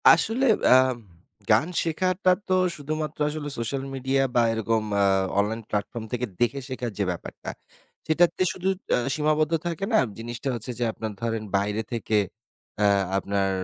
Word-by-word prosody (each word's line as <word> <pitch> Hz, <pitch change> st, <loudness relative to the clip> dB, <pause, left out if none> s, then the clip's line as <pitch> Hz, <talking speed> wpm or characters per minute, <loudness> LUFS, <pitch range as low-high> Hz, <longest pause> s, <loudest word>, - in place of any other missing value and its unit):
আসলে 245 Hz, +4 st, +4 dB, 0.3 s
আ -, -, +9 dB, 0.8 s
গান 155 Hz, -, +4 dB, 0.2 s
শেখাটা 185 Hz, +3 st, +1 dB, 0.2 s
তো 185 Hz, -, +1 dB, 0.2 s
শুধুমাত্র 155 Hz, +1 st, -4 dB
আসলে 150 Hz, -1 st, -4 dB
সোশ্যাল 125 Hz, +4 st, -2 dB
মিডিয়া 135 Hz, +1 st, +1 dB
বা 120 Hz, -, +5 dB
এরকম 115 Hz, 0 st, 0 dB, 0.2 s
আ -, -, +5 dB, 0.4 s
online 110 Hz, +3 st, -1 dB
platform 105 Hz, +3 st, -3 dB
থেকে 125 Hz, 0 st, -1 dB
দেখে 120 Hz, +3 st, +1 dB
শেখার 125 Hz, -2 st, -3 dB
যে 100 Hz, -, +1 dB
ব্যাপারটা 90 Hz, -, -7 dB, 0.6 s
সেটাতে 170 Hz, +3 st, +3 dB
শুধু 185 Hz, +1 st, -4 dB, 0.3 s
আ -, -, +2 dB, 0.2 s
সীমাবদ্ধ 155 Hz, +1 st, +1 dB
থাকে 170 Hz, +3 st, -2 dB
না -, -, +6 dB, 0.2 s
জিনিসটা 120 Hz, +3 st, -4 dB
হচ্ছে 120 Hz, +2 st, -4 dB
যে -, -, +1 dB
আপনার 110 Hz, 0 st, -5 dB
ধরেন 115 Hz, -2 st, -1 dB
বাইরে 105 Hz, +2 st, -1 dB
থেকে 110 Hz, -2 st, 0 dB, 0.7 s
আ -, -, +5 dB, 0.3 s
আপনার 100 Hz, 0 st, 0 dB
125 Hz, 150 wpm, -25 LUFS, 110-155 Hz, 0.8 s, আ